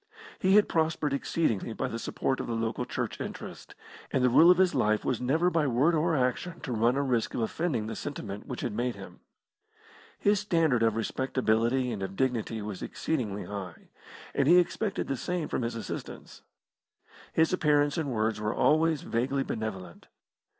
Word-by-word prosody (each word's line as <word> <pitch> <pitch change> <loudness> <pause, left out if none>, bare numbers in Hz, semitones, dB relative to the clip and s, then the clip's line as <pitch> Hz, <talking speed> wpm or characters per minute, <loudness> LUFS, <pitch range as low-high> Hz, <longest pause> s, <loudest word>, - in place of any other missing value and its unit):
He 190 +1 +4
had 210 - +6
prospered 160 -3 0
exceedingly 130 - -1
by 130 - -2
the 115 -2 -5
support 130 - -2
of - - -4
the 115 - -2
local 115 +2 -2
Church - - -4
interest, - - -8 0.3
and 130 - 0
the 125 - +4
rule 160 +7 +7
of 180 - +7
his 185 -1 +3
life 105 0 +1
was 125 - -1
never 160 +8 +2
by 165 -4 +2
word 135 +7 +3
or 165 +1 +2
action 135 +7 -1
to 150 - -5
run 120 +2 +2
a 140 - +1
risk 125 -4 0
of - - -1
offending 120 -1 -1
the 110 0 -5
sentiment 105 -8 -6
which 125 -4 -5
had 120 - -2
made 120 +2 -1
him. 95 -3 -11 1.0
His 205 0 +2
standard 165 - +2
of 115 -1 +3
respectability 125 +1 0
and 105 -4 -4
of 95 0 -4
dignity 115 -3 -1
was 105 -3 -6
exceedingly 110 -10 -3
high, 95 -4 -8 0.4
and 140 - +1
he 175 +3 +7
expected 195 +3 0
the 135 - -1
same 175 +4 -3
from - - -2
his 115 0 -2
assistants. 115 - -7 0.9
His 160 +2 +2
appearance 145 -4 +2
and 160 -5 -2
words 110 -2 0
were 105 +1 -1
always 155 0 +3
vaguely 135 +4 0
benevolent. 95 -8 -6
125 Hz, 180 wpm, -29 LUFS, 110-160 Hz, 1.0 s, rule